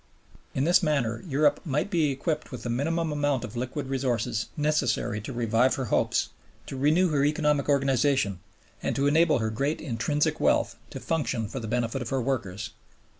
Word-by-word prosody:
In 135 - +1
this 175 +5 +5
manner 140 -9 0
Europe 145 0 +2
might 150 +6 -1
be 165 -5 +2
equipped 150 +3 -2
with 125 - -7
the 120 - -2
minimum 160 +6 0
amount 145 -3 0
of 120 -1 -7
liquid 130 +4 -3
resources 125 -4 -1
necessary 145 -8 0
to 110 - -6
revive 120 +1 +2
her 135 - -3
hopes, - - +1 0.4
to - - -7
renew 155 +7 +3
her 145 -3 +1
economic 150 -1 +1
organization, 135 -7 +2 0.4
and - - -1
to 140 - +1
enable 155 +1 +4
her 110 -2 -1
great 140 +8 -1
intrinsic 145 +2 -1
wealth - - +2
to - - -7
function 135 -9 -1
for 130 - -5
the 115 - -6
benefit 120 +2 -1
of 120 - -4
her 135 - 0
workers. 110 -5 -3
135 Hz, 175 wpm, -27 LUFS, 120-150 Hz, 0.4 s, this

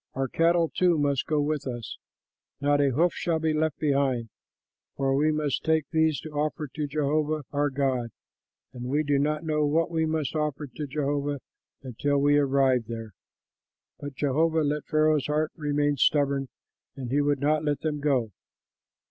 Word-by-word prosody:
Our 135 0 -1
cattle 165 +4 +2
too 180 -3 +3
must 140 -2 0
go 155 -1 +1
with 145 -1 -1
us; 120 -3 -5 0.6
not 145 0 +2
a 140 - +3
hoof 165 +7 +2
shall 170 -2 -1
be 160 0 0
left 155 -1 0
behind, 135 -6 0 0.7
for 135 -1 +1
we 150 +3 +3
must 150 -3 -1
take 160 -1 +2
these 160 -2 +2
to 155 - -8
offer 150 +1 -2
to 150 +2 -4
Jehovah 150 +1 0
our 145 0 +1
God, 130 -3 -1 0.6
and 125 -1 -7
we 145 +4 0
do 145 -1 +1
not 150 +2 0
know 155 -1 0
what 160 +3 +1
we 160 -1 +1
must 155 -2 -2
offer 150 -1 -1
to 145 +2 -7
Jehovah 145 0 -1 0.4
until 140 +3 -1
we 145 +1 +4
arrive 135 -3 +2
there." 115 -1 -6 0.9
But 145 -1 -7
Jehovah 160 +4 +1
let 150 0 -2
Pharaoh's 155 -2 +2
heart 155 +1 0
remain 145 -2 0
stubborn, 140 0 +2 0.5
and 130 -3 -6
he 145 +2 +3
would 145 -1 +1
not 150 +2 +1
let 145 -2 -1
them 150 -2 -2
go. 135 -7 +1
145 Hz, 170 wpm, -26 LUFS, 140-155 Hz, 0.9 s, we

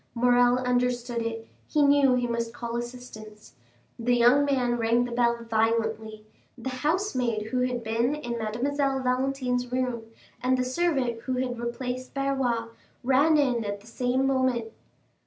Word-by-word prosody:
Morrel 245 +1 +4
understood 245 -1 0
it; 225 0 -4 0.2
he 300 - +2
knew 280 -2 +5
he 245 -1 0
must 235 0 -3
call 235 -1 -5
assistance. 235 -3 -8 0.5
The 245 +1 +2
young 245 +4 +5
man 250 -4 +1
rang 230 +2 +2
the 245 - -6
bell 235 -1 +1
violently; 220 -1 -1 0.3
the 260 +2 -5
housemaid 255 - -1
who 255 - 0
had 250 -1 -1
been 230 +5 0
in 240 -5 -4
Mademoiselle 270 +5 -1
Valentine's 250 -1 -1
room, 250 -3 -2 0.4
and 255 +1 +2
the 255 - 0
servant 260 -4 0
who 260 - -3
had 250 -1 -2
replaced 250 +2 -4
Barrois, 265 -4 0 0.3
ran 280 +5 +4
in 250 -5 +2
at 205 -1 -4
the - - -19
same 250 +3 0
moment. 260 -4 0
245 Hz, 150 wpm, -26 LUFS, 235-260 Hz, 0.5 s, knew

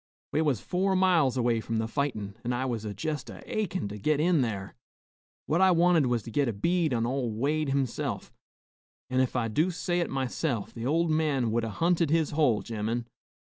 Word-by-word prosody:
We 155 - +1
was 145 -8 +1
four 190 +2 0
miles 175 -9 +3
away 120 -2 +1
from 115 0 -3
the 110 0 0
fightin,' 115 -7 -2
an' 125 +1 -1
I 125 +2 -1
was 115 -4 -3
jest 140 +2 -3
a - - -10
achin' 195 - -2
to 105 +1 -7
git 150 +7 +1
in 165 -1 +3
thar. 100 -5 -3 0.7
What 165 +4 +1
I 190 - +6
wanted 170 -4 +4
was 120 -3 0
to 115 - -8
git 140 +3 +1
a 115 - -1
bead 165 - +1
on 115 -2 +1
ol' 125 0 -1
Wade 145 +7 0
himself, 135 -3 -2 0.8
an' 130 - +2
ef 130 -1 +1
I 120 -2 +1
do 155 +11 +1
say 175 0 -1
it 170 - -1
myself, 130 -3 -2
the 115 +1 -4
ol' 165 +4 +2
man 150 -7 +1
would 115 +1 +1
'a' 115 - -2
hunted 165 - +1
his 160 0 +2
hole, 145 -8 +2
gemmen. 115 +1 -3
135 Hz, 205 wpm, -28 LUFS, 115-160 Hz, 0.8 s, I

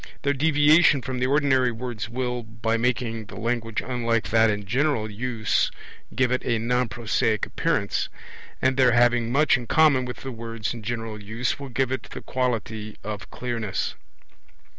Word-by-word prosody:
Their 140 - +2
deviation 150 0 +4
from 130 -2 -3
the 125 - +1
ordinary 135 -3 +3
words 120 -1 -5
will, 125 0 -2
by 115 0 -2
making 115 -1 -1
the - - -11
language 115 -1 -2
unlike 115 -5 0
that 115 0 +5
in 105 -1 -2
general 120 -1 0
use 110 0 0 0.5
give 130 -1 +2
it 125 - 0
a 115 -2 +1
non 125 +2 0
prosaic 110 0 0
appearance; 145 -12 -1 0.5
and 130 0 +2
their 125 -2 +5
having 120 -1 +3
much 140 +1 +4
in 120 -2 -8
common 145 -4 +4
with 125 - -7
the 135 - -4
words 115 -1 -4
in 120 - -8
general 110 -1 -4
use 110 +7 -2
will 140 -1 -7
give 130 +1 0
it 130 - -1
the - - -7
quality 110 -4 -2
of 105 -1 -6
clearness. 115 -5 -3
120 Hz, 165 wpm, -25 LUFS, 115-130 Hz, 0.5 s, that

